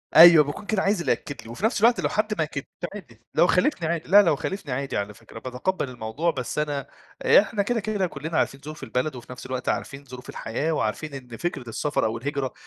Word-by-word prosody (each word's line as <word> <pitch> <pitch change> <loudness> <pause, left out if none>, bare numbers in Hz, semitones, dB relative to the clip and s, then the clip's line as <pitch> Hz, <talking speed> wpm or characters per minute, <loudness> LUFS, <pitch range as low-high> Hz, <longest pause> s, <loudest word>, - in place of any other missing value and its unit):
أيوه 165 -1 +10
باكون 145 +8 -6
كده 205 -2 0
عايز 200 0 +2
اللي 140 - +1
يأكد 140 +4 -3
لي، 115 - -12
وفي 120 - -3
نفس 220 -2 +1
الوقت 235 +2 +5
لو - - +1
حد 215 0 0
ما 160 - +2
أكدليش 145 -2 -5 0.3
عادي، 120 - -11
لو 175 - +5
خالفني 180 - +2
عادي 165 -2 -2
لأ، 205 +3 +9
لو 170 -6 +3
خالفني 190 -1 -4
عادي 135 +1 -2
على 100 0 -3
فكرة 110 - -12
باتقبّل 130 +6 -2
الموضوع، 125 +8 -1
بس 130 -1 -3
أنا 145 -2 -2 0.4
إحنا 205 0 +5
كده، 235 +3 0
كده 210 -3 -1
كلّنا 155 +1 -4
عارفين 135 - 0
ظروف 155 0 -8
البلد 130 +3 -1
وفي 125 0 -10
نفس 125 - -9
الوقت 130 0 -3
عارفين 140 +1 -3
ظروف 125 -1 -10
الحياة، 140 +8 -2
وعارفين 150 +2 -2
إن 125 -4 -8
فكرة 140 -9 -3
السفر 145 +6 0
أو 110 +1 -1
الهجرة 140 +1 -3
150 Hz, 225 wpm, -25 LUFS, 125-180 Hz, 0.4 s, أيوه